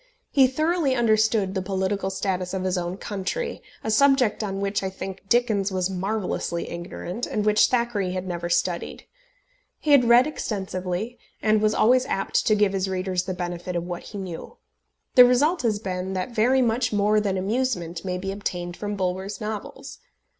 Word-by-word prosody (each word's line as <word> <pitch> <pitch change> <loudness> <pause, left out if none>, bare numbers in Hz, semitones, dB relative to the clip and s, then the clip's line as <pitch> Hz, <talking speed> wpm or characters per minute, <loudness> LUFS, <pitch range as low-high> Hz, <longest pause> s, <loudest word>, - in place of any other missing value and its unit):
He 270 -2 +6
thoroughly 310 +1 +1
understood 220 -4 +2
the 190 - -1
political 190 +1 -1
status 190 -1 -2
of 185 - -2
his 185 0 0
own 175 +1 -3
country, 210 - -4 0.2
a 220 - -1
subject 260 -3 +3
on 195 -2 -3
which, 200 +1 -1
I 190 - -2
think, 190 0 -7
Dickens 215 -5 +2
was 185 0 -1
marvellously 190 -2 -2
ignorant, 175 +5 -5
and 210 - -2
which 210 0 +5
Thackeray 235 -6 0
had 185 0 -3
never 175 -1 -3
studied. 175 0 -1 0.7
He 300 - -1
had 280 -3 +7
read 235 +2 +6
extensively, 195 -4 -4 0.2
and 215 -1 +2
was 215 0 +2
always 250 +3 +4
apt 195 - 0
to 215 - +5
give 205 -1 +2
his 190 0 -1
readers 185 -1 -1
the 185 -1 -3
benefit 175 0 -4
of 170 - -1
what 175 -1 -5
he 210 - -9
knew. 185 -4 -7 0.6
The 250 - +10
result 290 +8 +3
has 225 -4 +1
been 190 -2 -4
that 185 +5 -3
very 250 +4 +3
much 230 0 +1
more 210 0 +3
than 200 -2 -1
amusement 190 -5 -1
may 180 -1 -2
be 195 +1 -4
obtained 180 -3 -4
from 205 +1 -4
Bulwer's 190 +1 -3
novels. 210 -1 -6
200 Hz, 175 wpm, -24 LUFS, 185-225 Hz, 0.7 s, The